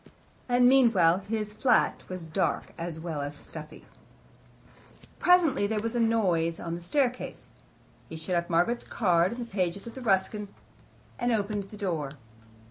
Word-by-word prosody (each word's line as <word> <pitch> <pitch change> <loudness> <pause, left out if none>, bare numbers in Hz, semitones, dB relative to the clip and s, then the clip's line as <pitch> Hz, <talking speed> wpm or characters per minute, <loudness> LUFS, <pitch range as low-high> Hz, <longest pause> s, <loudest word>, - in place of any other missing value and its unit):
And 245 0 +5
meanwhile, 225 -10 +5
his 210 +1 -4
flat 245 +1 +2
was 185 -2 -5
dark, 160 +4 -1
as 165 -1 -5
well 160 -3 -4
as 145 +1 -5
stuffy. 155 +1 -11 1.3
Presently 330 - +4
there 215 0 -2
was 230 +1 -2
a - - +1
noise 185 -8 +1
on 165 -1 -4
the 170 - -5
staircase. 250 +7 -2 0.6
He - - -7
shut 160 +3 -4
up 170 0 -1
Margaret's 175 +9 +1
card 175 -4 +2
in - - -8
the 240 - -4
pages 195 -3 -2
of 235 - -9
Ruskin, 205 0 +1 0.7
and 240 0 +1
opened 205 -2 -1
the 210 - -10
door. 165 -8 -2
200 Hz, 150 wpm, -28 LUFS, 170-230 Hz, 1.3 s, And